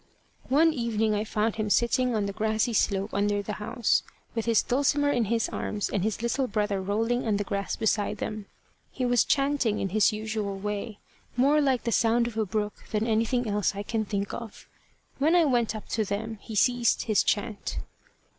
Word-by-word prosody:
One 315 Hz, +5 st, +4 dB
evening 225 Hz, -4 st, 0 dB
I 210 Hz, 0 st, 0 dB
found 220 Hz, +1 st, -1 dB
him 215 Hz, -1 st, -1 dB
sitting 240 Hz, +3 st, +2 dB
on 210 Hz, -2 st, 0 dB
the 200 Hz, -, -3 dB
grassy 220 Hz, +2 st, 0 dB
slope 200 Hz, -1 st, +1 dB
under 205 Hz, 0 st, +1 dB
the 210 Hz, -, -4 dB
house, 235 Hz, +1 st, +1 dB, 0.3 s
with 225 Hz, -2 st, -2 dB
his 230 Hz, -2 st, +3 dB
Dulcimer 285 Hz, +2 st, +2 dB
in 240 Hz, -5 st, +1 dB
his 225 Hz, +2 st, 0 dB
arms 210 Hz, -1 st, -3 dB
and 195 Hz, -, 0 dB
his 220 Hz, +2 st, -2 dB
little 255 Hz, +3 st, 0 dB
brother 210 Hz, -2 st, -1 dB
rolling 225 Hz, +5 st, 0 dB
on 210 Hz, -2 st, +2 dB
the 205 Hz, -, -1 dB
grass 200 Hz, -1 st, -3 dB
beside 215 Hz, -2 st, 0 dB
them. 210 Hz, -2 st, -5 dB, 0.4 s
He 255 Hz, -, -2 dB
was 245 Hz, -1 st, +4 dB
chanting 275 Hz, -6 st, +1 dB
in 195 Hz, -, -1 dB
his 215 Hz, +3 st, +3 dB
usual 215 Hz, -2 st, -3 dB
way, 210 Hz, +2 st, -4 dB, 0.4 s
more 285 Hz, +4 st, +4 dB
like 265 Hz, -4 st, +1 dB
the 235 Hz, -, -1 dB
sound 230 Hz, +1 st, +3 dB
of 235 Hz, -2 st, -5 dB
a 220 Hz, -2 st, 0 dB
brook 210 Hz, +1 st, -1 dB, 0.2 s
than 215 Hz, 0 st, 0 dB
anything 230 Hz, +2 st, +1 dB
else 205 Hz, -1 st, 0 dB
I 200 Hz, -, -4 dB
can 220 Hz, +1 st, -1 dB
think 200 Hz, -1 st, -3 dB
of. 230 Hz, -3 st, -8 dB, 0.5 s
When 315 Hz, +5 st, +3 dB
I 345 Hz, -2 st, +5 dB
went 240 Hz, -5 st, +1 dB
up 215 Hz, -, -8 dB
to 220 Hz, -, 0 dB
them 215 Hz, +2 st, -4 dB
he 220 Hz, -, -8 dB
ceased 245 Hz, +2 st, +3 dB
his 215 Hz, -3 st, +2 dB
chant. 210 Hz, 0 st, -2 dB
220 Hz, 195 wpm, -27 LUFS, 210-240 Hz, 0.5 s, I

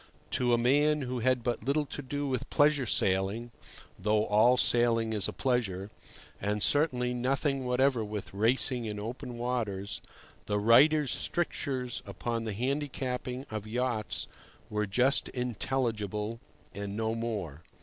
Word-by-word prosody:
To 125 Hz, -1 st, +1 dB
a 120 Hz, -, +5 dB
man 145 Hz, +5 st, +3 dB
who 125 Hz, -1 st, -3 dB
had 125 Hz, 0 st, +1 dB
but 120 Hz, 0 st, -2 dB
little 145 Hz, +2 st, +1 dB
to 145 Hz, -, -6 dB
do 145 Hz, +2 st, -3 dB
with 130 Hz, -3 st, -2 dB
pleasure 145 Hz, -3 st, +3 dB
sailing 100 Hz, +5 st, +1 dB, 0.5 s
(though 105 Hz, +2 st, +2 dB
all 115 Hz, +5 st, +4 dB
sailing 115 Hz, -2 st, +3 dB
is 105 Hz, -4 st, +1 dB
a -, -, -3 dB
pleasure), 105 Hz, -7 st, -1 dB, 0.5 s
and 105 Hz, 0 st, 0 dB
certainly 125 Hz, -5 st, +2 dB
nothing 135 Hz, +2 st, 0 dB
whatever 125 Hz, -1 st, +2 dB
with 105 Hz, -2 st, -6 dB
racing 120 Hz, +3 st, +2 dB
in 105 Hz, -1 st, -4 dB
open 120 Hz, +2 st, -6 dB
waters, 110 Hz, -5 st, -2 dB, 0.5 s
the 105 Hz, -, 0 dB
writer's 135 Hz, +7 st, +5 dB
strictures 130 Hz, -7 st, -1 dB
upon 115 Hz, +4 st, -3 dB
the 110 Hz, -, -3 dB
handicapping 130 Hz, +1 st, -3 dB
of 110 Hz, -1 st, -5 dB
yachts 120 Hz, -2 st, -1 dB, 0.4 s
were 105 Hz, 0 st, -1 dB
just 125 Hz, +7 st, +3 dB
intelligible 115 Hz, -3 st, -2 dB, 0.3 s
and 100 Hz, 0 st, -5 dB
no 110 Hz, 0 st, 0 dB
more. 105 Hz, -10 st, -4 dB
120 Hz, 140 wpm, -30 LUFS, 105-130 Hz, 0.5 s, a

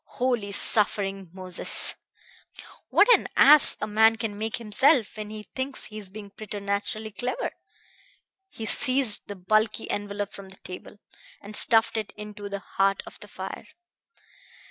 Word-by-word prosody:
Holy, 240 Hz, -5 st, -1 dB
suffering 195 Hz, -2 st, +1 dB
Moses! 185 Hz, -1 st, +2 dB, 1.0 s
What -, -, +4 dB
an -, -, +1 dB
ass 300 Hz, +1 st, +7 dB
a -, -, -2 dB
man 220 Hz, +1 st, +3 dB
can 225 Hz, -2 st, -5 dB
make 220 Hz, +2 st, -4 dB
of -, -, -4 dB
himself 235 Hz, +3 st, +2 dB
when 215 Hz, -1 st, -7 dB
he 215 Hz, 0 st, -9 dB
thinks 260 Hz, +4 st, -4 dB
he's 210 Hz, -3 st, -8 dB
being 205 Hz, 0 st, -11 dB
preternaturally 205 Hz, +1 st, -5 dB
clever!" 250 Hz, -, -4 dB, 1.0 s
He 225 Hz, -, -8 dB
seized 255 Hz, -2 st, +3 dB
the 205 Hz, -, -7 dB
bulky 215 Hz, +4 st, 0 dB
envelop 205 Hz, 0 st, -4 dB
from 195 Hz, -1 st, -11 dB
the 190 Hz, -, -15 dB
table, 180 Hz, +3 st, -10 dB, 0.5 s
and 210 Hz, +1 st, -10 dB
stuffed 225 Hz, 0 st, +4 dB
it 215 Hz, -2 st, -5 dB
into 210 Hz, -1 st, -9 dB
the 200 Hz, 0 st, -6 dB, 0.2 s
heart 195 Hz, 0 st, +1 dB
of -, -, -12 dB
the -, -, -11 dB
fire. -, -, -9 dB
210 Hz, 145 wpm, -25 LUFS, 200-225 Hz, 1.0 s, ass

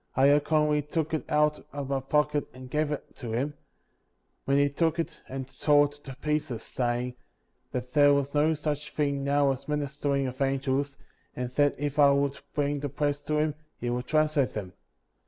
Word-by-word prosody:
*' -, -, -40 dB
I 130 Hz, -, +4 dB
accordingly 150 Hz, +1 st, +3 dB
took 155 Hz, +2 st, -2 dB
it 155 Hz, -, 0 dB
out 150 Hz, 0 st, +2 dB
of 140 Hz, -1 st, -5 dB
my 135 Hz, -1 st, +1 dB
pocket 150 Hz, +2 st, +1 dB
and 130 Hz, 0 st, -10 dB
gave 150 Hz, 0 st, +1 dB
it 150 Hz, -, -5 dB
to 115 Hz, -3 st, -5 dB
him, 135 Hz, +6 st, -1 dB, 0.9 s
when 140 Hz, 0 st, +3 dB
he 145 Hz, 0 st, +4 dB
took 160 Hz, +3 st, 0 dB
it 165 Hz, -, -3 dB
and 130 Hz, -1 st, -5 dB
tore 145 Hz, -1 st, +5 dB
it 145 Hz, -, -5 dB
to 135 Hz, -2 st, -7 dB
pieces, 145 Hz, -5 st, -2 dB
saying 125 Hz, 0 st, -1 dB, 0.6 s
that 125 Hz, 0 st, -4 dB
there 145 Hz, -1 st, +6 dB
was 140 Hz, 0 st, +1 dB
no 155 Hz, +2 st, +3 dB
such 150 Hz, -1 st, -3 dB
thing 140 Hz, -2 st, 0 dB
now 140 Hz, 0 st, +3 dB
as 135 Hz, +1 st, -5 dB
ministering 145 Hz, -1 st, -1 dB
of 130 Hz, +1 st, -5 dB
angels, 135 Hz, +1 st, 0 dB, 0.4 s
and 125 Hz, 0 st, -3 dB
that 145 Hz, +2 st, +3 dB
if 145 Hz, +1 st, -2 dB
I 140 Hz, -1 st, +8 dB
would 140 Hz, 0 st, +1 dB, 0.2 s
bring 145 Hz, 0 st, 0 dB
the 145 Hz, 0 st, -3 dB
plates 145 Hz, +1 st, -1 dB
to 150 Hz, -, -1 dB
him, 150 Hz, 0 st, +1 dB, 0.2 s
he 120 Hz, 0 st, -2 dB
would 125 Hz, +1 st, -2 dB
translate 155 Hz, -3 st, +2 dB
them. 95 Hz, -4 st, -5 dB
145 Hz, 190 wpm, -28 LUFS, 135-150 Hz, 0.9 s, I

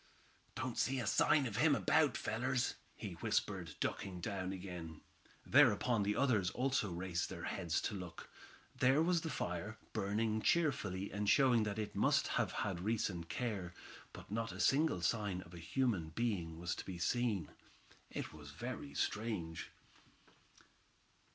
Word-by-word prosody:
"Don't 130 Hz, -1 st, -3 dB
see 135 Hz, 0 st, +1 dB
a 120 Hz, -, -2 dB
sign 140 Hz, +7 st, +4 dB
of 110 Hz, -3 st, -3 dB
him 145 Hz, +2 st, +5 dB
about, 155 Hz, +1 st, +3 dB
fellers," 125 Hz, +3 st, 0 dB, 0.2 s
he -, -, -6 dB
whispered, -, -, -1 dB
ducking 95 Hz, -2 st, -2 dB
down 95 Hz, +1 st, -3 dB
again. 90 Hz, -4 st, -7 dB, 0.4 s
Thereupon 120 Hz, -4 st, +5 dB
the 105 Hz, +1 st, +1 dB
others 110 Hz, -10 st, +3 dB
also 130 Hz, -5 st, 0 dB
raised 90 Hz, 0 st, -2 dB
their -, -, -6 dB
heads 85 Hz, -4 st, -1 dB
to -, -, -2 dB
look. 90 Hz, -4 st, -7 dB, 0.5 s
There 130 Hz, +4 st, +4 dB
was 170 Hz, 0 st, +2 dB
the 160 Hz, -, -3 dB
fire, 105 Hz, -, -3 dB, 0.2 s
burning 110 Hz, +1 st, 0 dB
cheerfully, 100 Hz, -, +1 dB
and 105 Hz, +1 st, 0 dB
showing 130 Hz, -5 st, +5 dB
that 100 Hz, -1 st, -2 dB
it 105 Hz, -1 st, -3 dB
must -, -, +3 dB
have -, -, +1 dB
had 95 Hz, -4 st, -2 dB
recent 95 Hz, -4 st, -1 dB
care. 100 Hz, -8 st, -3 dB, 0.4 s
But -, -, -11 dB
not 115 Hz, +1 st, -1 dB
a -, -, -8 dB
single 140 Hz, -, +3 dB
sign 100 Hz, -3 st, 0 dB
of 85 Hz, -1 st, -14 dB
a 85 Hz, -, -8 dB
human 85 Hz, -1 st, 0 dB
being 85 Hz, -6 st, -1 dB
was 90 Hz, +1 st, -2 dB
to -, -, -4 dB
be 95 Hz, -2 st, -5 dB
seen. 105 Hz, -3 st, 0 dB, 0.6 s
It -, -, -5 dB
was 75 Hz, -2 st, -10 dB
very 125 Hz, -, -6 dB
strange. 100 Hz, -7 st, -2 dB
105 Hz, 150 wpm, -37 LUFS, 90-125 Hz, 0.6 s, him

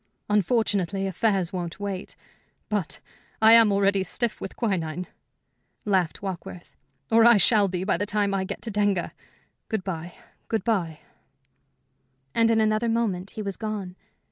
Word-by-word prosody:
"Unfortunately, 200 Hz, -2 st, +1 dB
affairs 195 Hz, -1 st, 0 dB
won't 175 Hz, -1 st, -5 dB
wait. 200 Hz, -2 st, -5 dB, 0.5 s
But 205 Hz, -7 st, -2 dB, 0.4 s
I 220 Hz, +1 st, +7 dB
am 230 Hz, -2 st, +7 dB
already 200 Hz, 0 st, +2 dB
stiff 235 Hz, +3 st, -2 dB
with 195 Hz, -, -6 dB
quinine," 180 Hz, -6 st, -2 dB, 0.8 s
laughed 190 Hz, -4 st, 0 dB
Warkworth 180 Hz, -2 st, -7 dB, 0.4 s
"or 225 Hz, 0 st, +6 dB
I 235 Hz, -1 st, +7 dB
shall 205 Hz, +1 st, +4 dB
be 180 Hz, -1 st, -3 dB
by 190 Hz, -, +1 dB
the 205 Hz, +3 st, -2 dB
time 205 Hz, -1 st, 0 dB
I 195 Hz, -1 st, 0 dB
get 190 Hz, -, -6 dB
to 225 Hz, -, -4 dB
Denga. 205 Hz, -3 st, 0 dB, 0.6 s
Good 220 Hz, -4 st, -2 dB
bye 175 Hz, -2 st, -5 dB, 0.3 s
good 225 Hz, -, -1 dB
bye." 180 Hz, -9 st, -1 dB, 1.3 s
And 230 Hz, 0 st, +3 dB
in 225 Hz, -1 st, +3 dB
another 215 Hz, +1 st, +1 dB
moment 205 Hz, -5 st, -1 dB
he 215 Hz, -, -3 dB
was 200 Hz, -2 st, -4 dB
gone. 210 Hz, -5 st, -5 dB
200 Hz, 145 wpm, -25 LUFS, 185-220 Hz, 1.3 s, I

